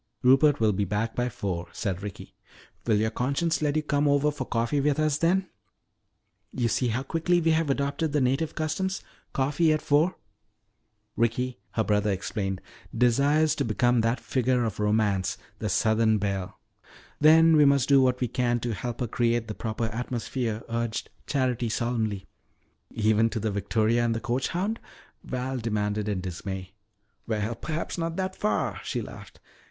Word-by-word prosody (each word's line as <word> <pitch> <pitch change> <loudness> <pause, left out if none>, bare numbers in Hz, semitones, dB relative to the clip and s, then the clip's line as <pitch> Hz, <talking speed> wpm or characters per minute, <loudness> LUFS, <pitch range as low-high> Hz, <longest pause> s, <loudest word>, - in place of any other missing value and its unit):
"Rupert 135 +3 +5
will 110 -2 +3
be 100 +2 0
back 105 +4 -1
by 125 0 0
four," 90 -6 -4
said 95 -3 -3
Ricky. 100 -1 -8 0.5
"Will 110 - +4
your 110 +1 +1
conscience 140 +8 0
let 150 -1 +1
you 155 - +1
come 145 -1 +1
over 145 +1 +3
for 145 -3 -5
coffee 120 +5 0
with 145 0 +1
us 155 -1 +1
then? 185 +3 +2 1.0
You 120 -2 0
see 125 +3 +1
how 120 +3 -1
quickly 165 +4 +1
we 165 -1 +2
have 160 -1 +1
adopted 140 +3 0
the 150 - +2
native 135 +5 0
customs 190 +5 -2 0.3
coffee 145 +4 +2
at 155 - +2
four." 150 +6 +2 1.0
"Ricky," 120 +2 0
her 110 - +1
brother 105 0 +1
explained, 95 0 -2 0.4
"desires 140 +6 +3
to - - -1
become 120 +2 +2
that 115 +2 +1
figure 125 -1 +1
of 110 -2 -3
Romance 105 -2 +1 0.2
the 105 - -2
southern 110 +2 +3
belle." 100 -2 -3 0.6
"Then 160 +2 +7
we 150 - +6
must 140 -2 +4
do 140 -1 +6
what 125 -1 +2
we 125 - +2
can 120 0 0
to 120 -2 -2
help 120 +5 -5
her 120 - 0
create 115 0 0
the 110 - -4
proper 110 +1 -3
atmosphere," 115 0 -3
urged 115 -1 -3 0.2
Charity 125 -4 0
solemnly. 110 -4 -1 0.6
"Even 110 +1 +2
to 115 - -3
the 110 0 -1
victoria 110 +3 +1
and 115 -1 +1
the - - -1
coach 125 +2 -1
hound?" 200 +6 -2 0.4
Val 130 +1 -3
demanded 105 -2 -1
in 100 -3 -1
dismay. 95 +1 -5 0.6
"Well, 110 0 -1
perhaps 160 +8 -4
not 165 0 -2
that 190 0 -2
far," 210 - -1
she - - -3
laughed. - - -11
120 Hz, 170 wpm, -27 LUFS, 110-145 Hz, 1.0 s, Then